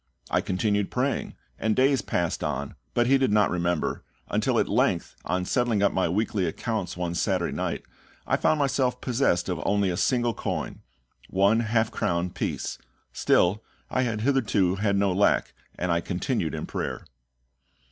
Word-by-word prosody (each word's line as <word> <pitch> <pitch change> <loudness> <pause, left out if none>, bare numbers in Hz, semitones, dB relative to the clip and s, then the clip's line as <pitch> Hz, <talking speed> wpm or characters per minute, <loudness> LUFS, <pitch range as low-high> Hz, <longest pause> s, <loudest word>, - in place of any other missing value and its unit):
I - - +3
continued 100 +1 0
praying, 130 +2 -1 0.2
and 110 -1 +1
days 135 +1 +3
passed 85 -2 -1
on, 70 +1 -3 0.2
but 120 - +3
he 135 +2 +4
did 130 -5 +2
not 105 -2 +3
remember, 85 -2 -1 0.3
until - - +1
at - - +2
length, - - +1
on 90 0 -1
settling 115 -2 +1
up 100 - +4
my 95 -2 +1
weekly 100 0 0
accounts 100 +1 -3
one 90 -1 -2
Saturday - - 0
night, - - -2 0.4
I - - +2
found 155 - +2
myself 130 -3 +1
possessed 120 -10 +1
of 90 -3 -2
only 100 -2 +2
a 85 - -3
single 120 0 +1
coin - - -4 0.5
one 100 +4 +3
half 110 -1 +1
crown 85 +1 -1
piece. - - -3 0.3
Still 100 +5 +2 0.3
I 130 - +1
had 115 -4 -1
hitherto 110 -8 +2
had 100 0 +1
no 100 -1 +2
lack, 100 +3 +2 0.2
and 90 -1 -1
I 85 0 +2
continued 90 - -2
in - - -4
prayer. - - -4
100 Hz, 165 wpm, -26 LUFS, 90-120 Hz, 0.5 s, he